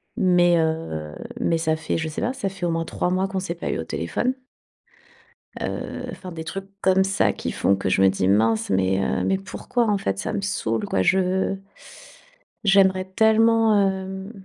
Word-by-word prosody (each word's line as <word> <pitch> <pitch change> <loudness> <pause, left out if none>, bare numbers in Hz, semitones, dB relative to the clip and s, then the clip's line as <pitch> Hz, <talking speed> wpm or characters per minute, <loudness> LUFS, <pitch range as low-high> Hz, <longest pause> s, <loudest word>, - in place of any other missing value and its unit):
Mais, 175 -2 +4
heu, 160 - -2 0.3
mais 165 - +2
ça 160 -1 0
fait 160 - -2
je 160 -1 -2
sais 155 - -5
pas, 240 - 0
ça 265 -6 -3
fait 190 -2 -5
au 170 - 0
moins 165 0 -1
3 175 - -2
mois 185 +1 +1
qu'on 190 0 -3
s'est 175 -2 -4
pas 170 - -5
eu - - -2
au - - -2
téléphone 85 - -2 1.2
heu, - - -4
enfin, 185 - -9
des 160 -1 -6
trucs 195 +5 -6
comme 190 0 +4
ça 195 0 +1
qui - - -4
font 100 - +2
que 95 -1 -2
je 95 - +2
me 95 - +6
dis: 95 0 0
«Mince, 110 +2 +2
mais, 95 0 +2
heu, - - 0
mais 190 - +1
pourquoi 230 +4 -2
en 205 - +2
fait 95 - -2
ça - - -3
me 205 - -1
saoule 115 - -1
quoi, 95 - 0
je 190 - +1 1.1
j'aimerais 190 -2 +4
tellement 220 +2 +4
hem», 190 +1 -5
185 Hz, 195 wpm, -23 LUFS, -, 1.2 s, me